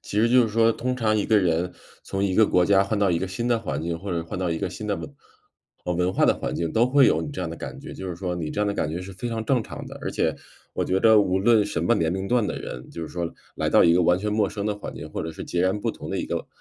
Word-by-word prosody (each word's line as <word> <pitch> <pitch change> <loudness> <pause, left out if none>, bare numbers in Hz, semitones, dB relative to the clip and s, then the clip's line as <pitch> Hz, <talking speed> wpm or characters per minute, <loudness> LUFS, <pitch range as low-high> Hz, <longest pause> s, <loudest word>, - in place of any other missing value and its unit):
其 105 - -3
实 115 - +4
就 125 0 +6
是 115 - 0
说 115 +1 +3
通 125 +2 -2
常 110 -3 +1
一 105 - 0
个 110 -2 +4
人 90 -1 0 0.3
从 95 +1 -2
一 95 -2 0
个 110 -1 +5
国 90 -1 +3
家 100 0 +4
换 100 +1 -1
到 100 -2 +3
一 85 - +1
个 95 - -3
新 115 +6 -3
的 120 -2 +2
环 75 -8 -4
境， 85 0 -3
或 100 +2 -6
者 85 -1 -2
换 90 +3 -6
到 90 -2 -1
一 80 - -1
个 - - -2
新 105 +3 -7
的 100 - 0
文 145 - -8 0.7
文 90 +1 0
化 - - +3
的 - - +4
环 - - -4
境 85 -2 -2
都 115 +2 +4
会 135 0 +5
有 - - +3
你 150 - -4
这 140 - -6
样 85 - -2
的 85 - -6
感 - - -7
觉。 - - -9
就 95 -1 -6
是 85 - -5
说 90 -1 -3
你 80 -3 -4
这 105 - -3
样 105 - +2
的 100 - 0
感 75 - -1
觉 85 - -4
是 95 +1 -8
非 110 +6 -5
常 115 -1 -3
正 125 0 +2
常 - - -8
的。 - - -9
而 - - -3
且 - - 0 0.4
我 - - -1
觉 95 +1 +1
得 110 -1 +6
无 95 -1 +1
论 110 0 +4
什 - - -2
么 120 - +4
年 80 -5 +1
龄 95 0 -3
段 120 -2 +2
的 - - -3
人， 60 +1 -8
就 85 - -7
是 80 - -5
说， 85 -1 -3 0.3
来 - - 0
到 - - +5
一 85 - +6
个 90 - +4
完 90 +1 +4
全 105 +1 -2
陌 105 -2 +2
生 100 -1 -5
的 105 -1 0
环 105 - -8
境， - - -8
或 - - -4
者 80 - -4
是 - - -7
截 85 - -2
然 95 +3 +1
不 - - 0
同 - - -9
的 - - -2
一 - - -2
个， - - -2
呃 - - -11
100 Hz, 360 characters per minute, -24 LUFS, 90-110 Hz, 0.7 s, 就